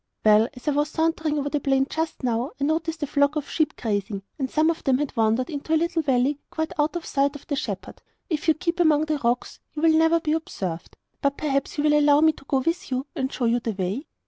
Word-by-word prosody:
'Well, 215 +1 +6
as 250 - -13
I - - +4
was 295 +1 +1
sauntering 320 -1 0
over 285 0 -1
the 295 - +1
plain, 270 -1 +2
just 320 -2 -3
now, 245 +2 -1
I - - -2
noticed 320 +1 -1
a - - +2
flock 285 +1 +2
of 295 -2 -2
sheep 310 -2 -1
grazing, 205 -2 -2 0.2
and 265 -1 -1
some 315 +4 +3
of 330 - -7
them 260 -2 +3
had 290 0 -3
wandered 225 +6 +1
into 305 +2 -1
a - - +5
little 335 +1 0
valley 275 0 +1
quite 315 0 -3
out 295 +3 +1
of 345 - -4
sight 280 +1 +1
of 290 - -10
the 285 - -2
shepherd. 200 -8 -5 0.3
If 320 -3 -2
you 320 - +5
keep 340 +1 -2
among 310 -3 +4
the 310 -1 -1
rocks 240 -1 -1 0.2
you 300 - -4
will 325 -1 +6
never 325 +1 +4
be 310 -2 -1
observed. 185 - -4 0.2
But 280 0 0
perhaps 275 -1 -1
you 290 - 0
will 300 0 +4
allow 290 0 +5
me 315 0 +6
to 295 - -17
go 270 -1 +1
with 330 +6 -2
you 260 +1 -2
and 265 -3 -2
show 245 - -2
you 235 +1 +2
the 230 -2 -3
way? 195 - -3
290 Hz, 250 wpm, -24 LUFS, 255-315 Hz, 0.3 s, Well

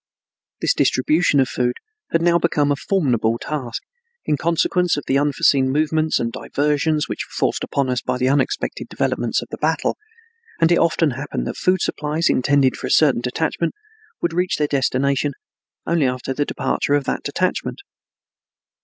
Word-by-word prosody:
This - - +2
distribution 150 +2 +2
of 130 - +3
food 125 -1 -1 0.3
had 165 0 +1
now 170 0 +4
become 145 -4 +1
a - - +2
formidable 125 - 0
task, 130 -4 -5 0.4
in 150 - +1
consequence 170 +2 +1
of 145 - -3
the 135 - +2
unforeseen 140 -2 +2
movements 155 +2 +1
and 115 -1 -1
diversions 150 +4 0
which - - -4
were - - -11
forced - - 0
upon 140 -1 -1
us 125 -1 -1
by 125 0 -2
the 130 0 +1
unexpected 135 0 0
developments - - -1
of - - -14
the - - -6
battle; - - 0 0.6
and 165 +1 +4
it 170 - +4
often 165 -2 +2
happened 135 +4 -4
that - - -4
food 185 0 +1
supplies 150 +3 0
intended 135 0 +2
for - - -5
a - - -5
certain 140 -6 +4
detachment 160 +6 -2 0.5
would 170 -1 0
reach 180 +1 0
their 150 - +1
destination 140 0 0 0.5
only 165 -5 +2
after 125 +1 -3
the 145 +2 -1
departure 145 - 0
of 145 - +1
that - - -2
detachment. 185 - -2
145 Hz, 170 wpm, -21 LUFS, 130-160 Hz, 0.6 s, now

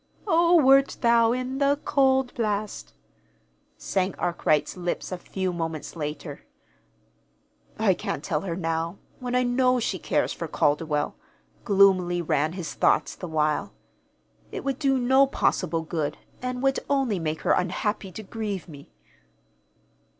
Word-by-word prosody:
"'O 340 -2 +4
wert 275 -3 +5
thou 235 -1 +4
in 255 +2 -2
the 280 0 +2
cauld 265 -2 +2
blast,'" 210 -2 -3 0.8
sang 190 -1 -1
Arkwright's 155 -3 0
lips 175 0 -3
a 185 - -3
few 185 0 -3
moments 165 -2 -4
later. 150 -2 -5 1.4
"I - - +3
can't - - -4
tell - - -1
her 180 -4 -3
now 165 +1 -2 0.2
when 250 -1 -3
I 250 - +3
know 250 +1 +2
she 195 -5 -2
cares - - 0
for 165 - -5
Calderwell," 150 0 0 0.5
gloomily 190 -3 +4
ran 155 -1 0
his 180 -3 -5
thoughts, - - +2
the 180 - -7
while. 155 -2 0 0.8
"It - - -5
would 275 -1 -2
do 270 -3 +2
no 265 +2 +4
possible 165 - 0
good, 160 -2 -3 0.2
and 250 0 -3
would 270 0 +2
only 265 -8 +1
make 155 -1 -3
her - - +1
unhappy 190 +2 -1
to 220 - -7
grieve 205 -3 -5
me." 145 -4 -13
200 Hz, 140 wpm, -25 LUFS, 165-255 Hz, 1.4 s, wert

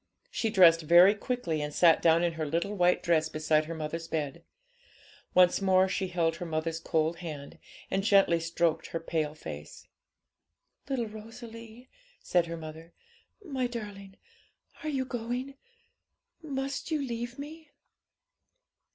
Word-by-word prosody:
She 225 - -1
dressed 175 -6 +6
very 175 +5 +7
quickly, 205 - -2
and 150 0 -3
sat 165 +1 +5
down 165 +1 +4
in 170 -1 +1
her 160 -1 -3
little 170 +7 -1
white 180 -2 +2
dress 160 -2 +2
beside 155 0 +1
her 165 +1 -5
mother's 160 +1 -4
bed. 150 -4 -3 0.9
Once 180 +1 +5
more 190 -1 +4
she 190 0 -2
held 165 -2 0
her 175 - -5
mother's 160 0 -2
cold 160 0 0
hand, 150 -5 -8 0.3
and 195 0 0
gently 195 -5 +4
stroked 165 0 0
her 165 - -4
pale 155 -2 -2
face. 75 - -9 1.0
'Little 255 -4 0
Rosalie,' 225 +2 -11 0.3
said 175 -1 +1
her 170 0 -5
mother, 160 +1 -10 0.5
'my 265 -6 -1
darling, 205 -5 -8 0.6
are 310 - -3
you 270 -3 -1
going? 245 +2 -4 0.9
must 275 -2 -4
you 310 -2 0
leave 240 -2 -4
me?' 305 +2 -9
180 Hz, 140 wpm, -29 LUFS, 165-230 Hz, 1.0 s, very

